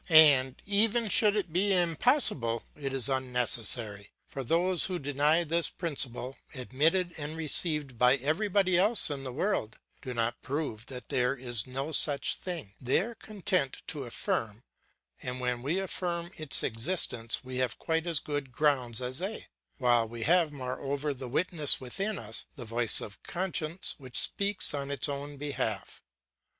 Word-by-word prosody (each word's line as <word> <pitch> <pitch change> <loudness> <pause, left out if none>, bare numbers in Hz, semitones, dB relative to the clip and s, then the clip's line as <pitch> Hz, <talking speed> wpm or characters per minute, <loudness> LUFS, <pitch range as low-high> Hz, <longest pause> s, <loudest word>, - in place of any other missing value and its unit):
And 145 -5 +6
even 215 +3 +4
should 210 +1 +4
it 190 -6 -2
be 195 +3 +2
impossible, 165 - +1
it 140 -2 -5
is 135 -1 +1
unnecessary; 120 -5 +1 0.2
for 135 - -7
those 175 +6 +1
who 185 -2 -3
deny 145 +3 +1
this 170 +1 +1
principle, 135 -6 -2 0.2
admitted 160 +8 0
and 150 +2 -3
received 150 -5 +2
by 125 +1 +5
everybody 180 - +1
else 205 -3 +4
in 140 -2 -5
the 130 - -5
world, 125 - -2 0.2
do 125 -1 -6
not 115 +1 -2
prove 130 -5 -4
that 125 -2 -9
there 130 -1 0
is 120 -3 -1
no 135 +4 -4
such 145 -2 +3
thing; 165 - -6
they 125 0 +2
are 225 +7 -4
content 195 - -3
to 145 -4 -3
affirm, 115 -1 -3 0.6
and 125 0 -4
when 125 -1 -2
we 150 +8 -1
affirm 175 -2 -2
its 155 -4 +2
existence 115 -2 +1
we 130 0 -7
have 130 -2 -1
quite 165 +1 -2
as 165 -3 +2
good 145 -3 -5
grounds 130 -4 +1
as 125 +2 -2
they, 195 +5 -5 0.3
while 120 -4 +2
we 115 0 -7
have 170 +1 +3
moreover 140 +2 -4
the 130 -1 -8
witness 155 +1 +2
within 195 +11 -4
us, 110 -4 -6
the 125 - -8
voice 115 0 +3
of 105 - -9
conscience, 175 -1 -1
which 130 -3 -4
speaks 200 -4 +1
on 140 -1 -4
its 140 0 0
own 145 0 -5
behalf. 145 0 -4
140 Hz, 160 wpm, -29 LUFS, 125-175 Hz, 0.6 s, And